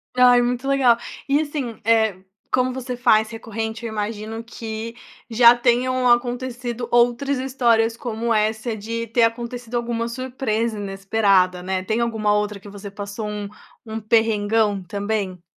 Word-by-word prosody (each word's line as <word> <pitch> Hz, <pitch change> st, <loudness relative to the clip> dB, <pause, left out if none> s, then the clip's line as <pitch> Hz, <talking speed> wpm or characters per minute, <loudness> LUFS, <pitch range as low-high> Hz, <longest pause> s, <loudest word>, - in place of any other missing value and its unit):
Ai, 250 Hz, -1 st, +6 dB
muito 250 Hz, +2 st, -2 dB
legal. 270 Hz, -4 st, +4 dB, 0.3 s
E 280 Hz, +1 st, +3 dB
assim, 285 Hz, -7 st, -4 dB
eh, 220 Hz, -2 st, +3 dB, 0.4 s
como 255 Hz, 0 st, +2 dB
você 255 Hz, 0 st, -5 dB
faz 220 Hz, -2 st, +3 dB
recorrente, 225 Hz, 0 st, -5 dB
eu 230 Hz, -, -4 dB
imagino 220 Hz, +1 st, -4 dB
que 230 Hz, 0 st, -6 dB, 0.3 s
já 235 Hz, +1 st, +7 dB
tenham 250 Hz, +1 st, +2 dB
acontecido 245 Hz, 0 st, 0 dB
outras 245 Hz, +3 st, +2 dB
histórias 235 Hz, -4 st, +2 dB
como 235 Hz, -2 st, -3 dB
essa, 220 Hz, +1 st, 0 dB
de 230 Hz, +2 st, -4 dB
ter 230 Hz, +2 st, +2 dB
acontecido 235 Hz, +1 st, -2 dB
alguma 235 Hz, -1 st, -1 dB
surpresa 235 Hz, -3 st, -2 dB
inesperada, 195 Hz, -2 st, +1 dB
né. 185 Hz, 0 st, -2 dB
Tem 220 Hz, +4 st, -1 dB
alguma 220 Hz, -3 st, 0 dB
outra 210 Hz, -1 st, -1 dB
que 205 Hz, -, -12 dB
você 200 Hz, 0 st, -9 dB
passou, 205 Hz, +1 st, -6 dB
um 210 Hz, -1 st, -5 dB, 0.4 s
um 220 Hz, 0 st, -5 dB
perrengão 215 Hz, -2 st, +2 dB
também? 200 Hz, -1 st, -3 dB
230 Hz, 145 wpm, -22 LUFS, 215-245 Hz, 0.4 s, já